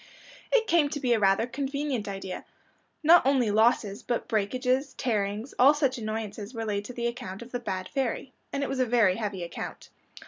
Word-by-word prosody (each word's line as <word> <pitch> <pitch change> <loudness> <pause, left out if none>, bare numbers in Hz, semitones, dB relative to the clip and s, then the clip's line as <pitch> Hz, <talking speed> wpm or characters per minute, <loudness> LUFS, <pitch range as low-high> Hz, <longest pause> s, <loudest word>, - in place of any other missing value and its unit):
It 475 -3 +4
came 335 -7 +3
to 290 - -4
be 250 -4 +2
rather 195 -1 +3
a - - -3
convenient 275 -3 -2
idea. 195 -2 -5 0.6
Not 335 +3 +7
only 260 -5 +3
losses, 215 -1 +2
but 240 - -2
breakages, 255 +6 0
tearings, 215 0 -2
all 275 +4 +7
such 270 -4 0
annoyances 215 0 -5
were 225 0 -3
laid 205 -1 -2
to 250 - -7
the 235 -1 -3
account 225 -4 -4
of 240 - -14
the 245 - -2
bad 185 -5 -4
fairy. 265 -1 -2 0.2
And 280 - -1
it - - -1
was 270 -1 -3
a 255 - +3
very 220 -6 +3
heavy 205 -5 -3
account. 170 - -7
235 Hz, 195 wpm, -28 LUFS, 205-270 Hz, 0.6 s, Not